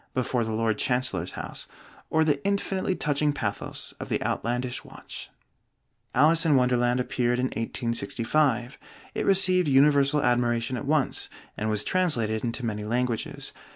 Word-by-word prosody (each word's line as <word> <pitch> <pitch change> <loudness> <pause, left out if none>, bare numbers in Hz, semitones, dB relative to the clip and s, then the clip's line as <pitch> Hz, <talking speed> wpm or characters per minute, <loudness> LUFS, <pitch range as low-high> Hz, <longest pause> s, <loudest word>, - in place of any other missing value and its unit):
before 125 -1 0
the 110 - -3
Lord 110 -1 0
Chancellor's 125 -9 -1
house, - - -7 0.4
or 160 0 +3
the 145 -2 +1
infinitely 195 -1 0
touching 145 -1 +1
pathos 105 -7 -4
of - - -6
the - - 0
Outlandish 125 +2 -2
Watch. - - -10 0.9
'Alice 160 +5 +5
in 155 -3 +4
Wonderland' 125 -1 +2
appeared 125 -1 0
in 125 - +1
1865; 120 +2 -1 0.3
it - - -2
received 185 -3 +4
universal 140 +1 +4
admiration 120 -1 +1
at 130 +3 -5
once, 150 -3 0 0.3
and 110 +1 -2
was 105 -1 +1
translated 120 -13 +1
into 120 +1 -3
many 105 -2 -3
languages. 120 +1 -2
125 Hz, 140 wpm, -26 LUFS, 115-145 Hz, 0.9 s, Alice